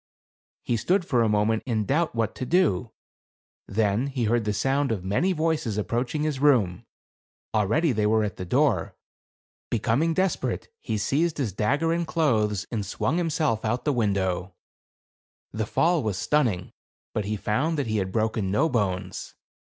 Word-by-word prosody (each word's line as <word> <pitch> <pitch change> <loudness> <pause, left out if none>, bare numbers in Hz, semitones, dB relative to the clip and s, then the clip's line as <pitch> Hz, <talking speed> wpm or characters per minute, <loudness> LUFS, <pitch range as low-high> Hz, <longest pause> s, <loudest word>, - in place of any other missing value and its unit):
He 120 - 0
stood 180 - +1
for 125 -8 +2
a 115 - +3
moment 105 +1 +2
in 110 -4 0
doubt 155 - 0
what 115 -2 0
to - - -6
do; 125 - +1 0.8
then 105 +4 +1
he 130 -3 -2
heard 115 0 +1
the 105 - +1
sound 135 +4 +1
of 100 -5 -2
many 105 - +1
voices 155 - 0
approaching 120 +7 -1
his 150 -3 -1
room; 120 -12 +2 0.7
already 115 - +2
they 105 -3 +1
were 110 0 +3
at 100 -3 -3
the - - -4
door. 90 - +1 0.7
Becoming 120 +9 +1
desperate, 190 +1 -1
he 110 - -3
seized 150 +10 0
his 125 -9 -2
dagger 145 - +1
and 170 0 -1
clothes, 110 - +1
and 110 -4 -1
swung 100 - -1
himself 155 -9 0
out 120 +3 0
of - - -34
the 145 - +2
window. 95 -5 -1 1.0
The 110 0 -3
fall 170 +5 +2
was 105 -5 -2
stunning; 115 -10 0 0.4
but 105 - -1
he 105 +2 -1
found 150 +11 0
that 145 - 0
he 110 -1 -1
had 95 -2 -1
broken 110 -2 0
no 140 +12 +2
bones. 100 -8 -2
115 Hz, 170 wpm, -26 LUFS, 105-150 Hz, 1.0 s, a